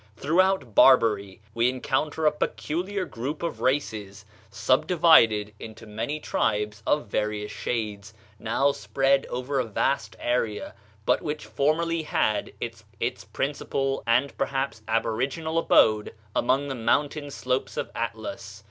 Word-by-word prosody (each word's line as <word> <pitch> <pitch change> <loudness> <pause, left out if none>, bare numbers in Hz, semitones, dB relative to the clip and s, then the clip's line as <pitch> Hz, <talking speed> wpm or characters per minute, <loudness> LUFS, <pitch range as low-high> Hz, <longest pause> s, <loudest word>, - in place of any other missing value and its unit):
Throughout 170 - +2
Barbary 105 -6 +4
we 115 +2 +3
encounter 140 +5 -1
a 150 - +6
peculiar 180 +6 -2
group 135 +6 -5
of 170 - -3
races, 105 -7 -1 0.2
subdivided 115 - +4
into 115 0 -10
many 110 +8 -4
tribes 105 -6 -1
of 150 -3 +2
various 105 0 -2
shades, 105 -1 -4 0.3
now 125 +6 +2
spread 135 +5 +1
over 130 +3 -2
a - - +2
vast 125 +5 -1
area, 120 -3 -1 0.3
but - - +3
which 150 0 -4
formerly 165 +3 0
had 110 -8 0
its - - -6 0.4
principal 135 -1 -2
and 125 +4 +2
perhaps 135 -4 -1
aboriginal 130 +9 0
abode 110 -10 +3 0.2
along 135 +4 +2
the 135 - -3
mountain 145 +5 0
slopes 130 -1 -2
of - - -3
Atlas.... 115 -2 -5
125 Hz, 120 wpm, -26 LUFS, 110-145 Hz, 0.4 s, a